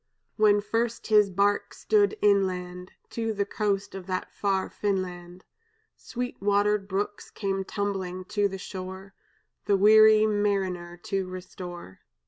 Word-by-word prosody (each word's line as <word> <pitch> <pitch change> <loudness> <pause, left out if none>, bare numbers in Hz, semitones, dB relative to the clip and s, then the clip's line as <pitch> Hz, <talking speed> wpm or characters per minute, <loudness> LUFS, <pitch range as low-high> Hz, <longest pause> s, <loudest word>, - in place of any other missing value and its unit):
"When 210 -1 +4
first 230 +2 -2
his 210 -2 +4
bark 200 +2 0
stood 425 0 +2
inland 185 -3 0 0.2
To 225 -1 -2
the 200 -1 -1
coast 200 -1 -2
of 190 -1 -8
that 185 -1 -3
far 195 -2 0
Finland, 180 -3 -4 0.5
Sweet 245 -2 -6
watered 205 0 +2
brooks 205 +1 -3
came 195 -2 -2
tumbling 190 -2 -3
to 205 -1 +1
the 195 -1 -6
shore, 190 +1 -8 0.5
The 200 - +3
weary 215 +1 +7
mariner 195 -5 -1
to 195 -3 -2
restore. 180 - -9
195 Hz, 125 wpm, -27 LUFS, 185-210 Hz, 0.5 s, weary